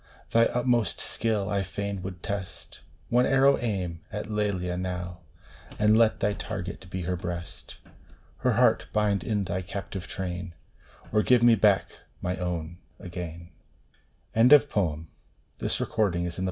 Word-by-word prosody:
Thy 115 0 +5
utmost 120 -2 +1
skill 110 -3 -1
I 100 -1 0
fain 100 +1 -4
would 90 -2 -7
test; 100 -2 -6 0.3
One 125 +1 +4
arrow 135 +1 +4
aim 95 -8 -2
at 105 +1 -5
Lelia 100 -4 -1
now, 90 -1 -4 0.6
And 105 +1 +4
let 115 -1 +4
thy 105 - +2
target 95 -3 -6
be 90 0 -4
her 90 +2 -1
breast! 85 -1 -7 0.6
Her - - +1
heart - - +3
bind 105 -2 +1
in 105 -3 0
thy 90 0 -2
captive 95 0 -6
train, 90 -2 -5 0.6
Or 105 - +3
give 125 +1 +4
me 120 -1 +7
back 105 - +2 0.2
my 90 +1 -2
own 85 -1 -4 0.2
again 85 -2 -7 0.8
1 115 +2 +5
THE 150 - +10
DREAM 90 - -2
OF - - -5
LOVE. 90 -5 -1
95 Hz, 140 wpm, -27 LUFS, 90-110 Hz, 0.8 s, THE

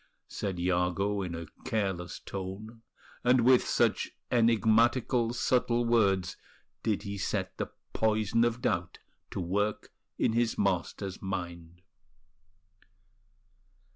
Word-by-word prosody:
said 95 -4 -4
Iago, 90 +3 +1
in 90 -3 -4
a 85 0 -5 0.2
careless 95 -5 -2
tone; 100 +4 -7 0.4
and 125 0 +5
with 125 +1 +5
such - - +2 0.2
enigmatical, 115 +1 +3
subtle 120 0 +1
words 100 -6 +2 0.4
did 105 -3 0
he 100 -1 -5
set 95 - -2
the - - -1 0.3
poison 110 +1 +2
of 120 +1 0
doubt 85 -7 -1 0.3
to - - -5
work 100 +4 -1 0.2
in - - +2
his 120 0 +1
master's 95 -1 -1
mind. 85 -2 -6
105 Hz, 105 wpm, -30 LUFS, 95-115 Hz, 0.4 s, and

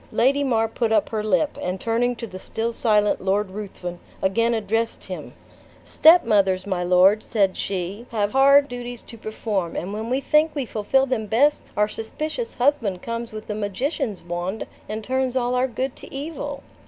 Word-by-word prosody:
Lady 280 +4 +3
mar 225 -4 +2
put 225 0 -1
up 210 -2 +2
her 215 -2 -2
lip, 215 +8 +1
and 180 +1 -2
turning 240 +3 0
to 235 - -6
the 185 -4 -9
still 230 +4 -3
silent 210 -3 +2
Lord 195 +1 0
Ruthven, 185 -3 -6 0.2
again 230 +5 +2
addressed 225 +1 -1
him. - - -7 0.5
"Stepmothers, 200 - +5
my 185 -3 -1
lord," 185 +4 +5
said 200 -4 +1
she, 195 +4 -4
"have 210 -2 0
hard 280 +1 +6
duties 245 -1 -7
to - - -11
perform; 210 -5 -3
and 190 +4 -4
when 220 +2 -4
we 260 +2 +1
think 305 +3 +2
we 280 -3 -1
fulfill 230 +5 +1
them 240 -5 -2
best, 280 +8 +3 0.2
our 210 0 +3
suspicious 310 - -5
husband 245 -9 +1
comes 230 0 -4
with 215 0 -8
a 210 - -2
magician's 215 - -2
wand, 175 +4 -3 0.2
and 215 +1 -4
turns 260 +1 -1
all 245 -1 +1
our 250 +1 +2
good 260 +1 -3
to - - -12
evil." 295 +4 -5
225 Hz, 180 wpm, -23 LUFS, 200-255 Hz, 0.5 s, hard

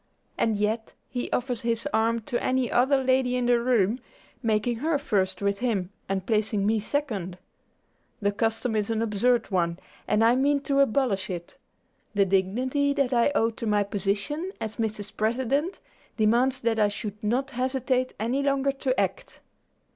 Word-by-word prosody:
And 220 -2 +1
yet 215 +2 -1
he 245 -1 -4
offers 245 -2 -1
his 230 +3 0
arm 225 +1 +2
to 240 +2 -3
any 255 -1 +1
other 265 +2 +3
lady 255 -1 +2
in 250 -1 0
the 240 0 +4
room, 235 -2 +2 0.4
making 225 0 +1
her 305 +5 +1
first 190 -8 -1
with 200 0 0
him 205 -7 -1 0.2
and 190 -1 -1
placing 210 -2 +1
me 220 +1 +2
second. 210 -8 -3 0.8
The 205 -1 +1
custom 225 +2 -1
is 210 0 0
an 225 0 0
absurd 230 +2 +1
one, 170 -2 +1 0.3
and 210 +2 +3
I 230 +2 +5
mean 280 +2 +2
to 280 0 0
abolish 230 -7 +2
it. 175 -2 -7 0.6
The 200 -1 +4
dignity 250 +10 +1
that 275 -3 0
I 240 +3 +3
owe 225 -3 +3
to 225 0 -5
my 210 -1 +3
position, 205 - -2
as 220 0 -5
Mrs. 210 -2 -3
President, 260 - 0 0.4
demands 240 +4 +2
that 225 -1 +1
I 210 - +5
should 210 +1 -6
not 255 +6 0
hesitate 255 0 -1
any 240 +6 0
longer 275 0 +1
to 270 -1 -1
act." - - -2
230 Hz, 165 wpm, -26 LUFS, 210-260 Hz, 0.8 s, I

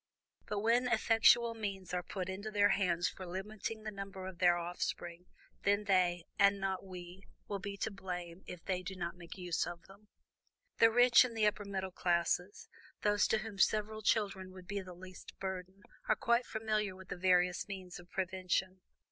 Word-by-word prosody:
But 210 -1 -2
when 235 +3 +3
effectual 230 0 +5
means 195 -5 -5
are 180 - 0
put 185 0 -5
into 195 +3 -4
their 205 -1 +4
hands 175 -4 +2
for 190 - -7
limiting 210 +4 -5
the 215 - -4
number 195 -2 -7
of 185 -2 -8
their 175 -1 +5
offspring, 175 0 -4 0.3
then 205 +1 +2
they, 180 -3 +2 0.2
and 200 0 +5
not 190 -1 -2
we, 180 -1 -9 0.3
will 200 - -3
be 200 +1 -5
to 210 - -2
blame 180 -2 -6
if 180 -2 -9
they 185 -2 -1
do 190 +1 -6
not 175 -1 -4
make 175 +1 -10
use 180 -3 -1
of 170 -1 -7
them. 200 +2 -17 0.7
"The 225 - +8
rich 245 +1 +7
and 235 -3 -4
the 215 - +3
upper 210 0 +1
middle 190 -1 -3
classes, 180 +2 0 0.4
those 205 -1 +3
to 220 - +3
whom 215 -2 -6
several 215 +2 +2
children 195 -3 0
would 185 -1 -11
be 200 +1 -3
the 185 -1 -10
least 185 +1 -11
burden, 190 +1 -5 0.3
are 215 - +5
quite 235 +2 +2
familiar 215 -3 -1
with 190 0 -13
the - - -3
various 180 0 +3
means 185 -3 -7
of 175 0 -15
prevention. 185 0 -1
190 Hz, 185 wpm, -34 LUFS, 180-210 Hz, 0.7 s, The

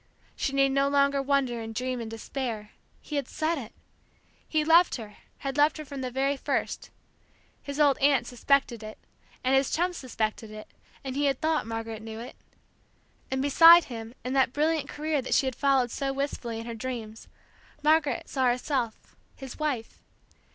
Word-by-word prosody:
She - - -1
need 275 0 +4
no 275 +1 +2
longer 280 0 +3
wonder 270 -4 0
and 225 0 -7
dream 255 0 -2
and 225 - -6
despair: 225 -1 -5 0.3
he 300 - -5
had 275 -3 -2
said 315 0 -1
it. 230 -4 -9 0.8
He 310 -1 +1
loved 335 +3 +5
her, 215 -4 -9 0.2
had 275 0 -4
loved 295 +2 +4
her 310 - -7
from 275 -1 -7
the 255 - -3
very 270 +3 0
first. - - -2 0.7
His 280 +1 -6
old 285 -3 +4
aunt 275 -3 +3
suspected 245 -1 +1
it, 215 0 -9 0.5
and 260 +1 +2
his 270 0 +3
chum 355 +2 0
suspected 225 -6 -3
it, 215 0 -10 0.4
and 265 -1 -5
he 290 +1 +1
had 275 -2 +1
thought 315 -5 0
Margaret 225 -1 -5
knew 220 0 -8
it. 240 +2 -9 0.9
And 265 0 -1
beside 330 +4 +8
him 230 -2 -8
in 255 - -3
that 265 -2 +2
brilliant 305 -1 0
career 300 -1 -1
that 255 - 0
she 275 - +3
had 260 -2 -2
followed 270 -4 +2
so 275 -1 -2
wistfully 270 -4 -3
in 225 - -7
her 235 - -5
dreams, 225 -2 -6 0.6
Margaret 305 -1 +2
saw 265 -2 0
herself, 245 -2 -2 0.2
his 265 0 -9
wife. 275 -7 -3
270 Hz, 180 wpm, -27 LUFS, 235-285 Hz, 0.9 s, beside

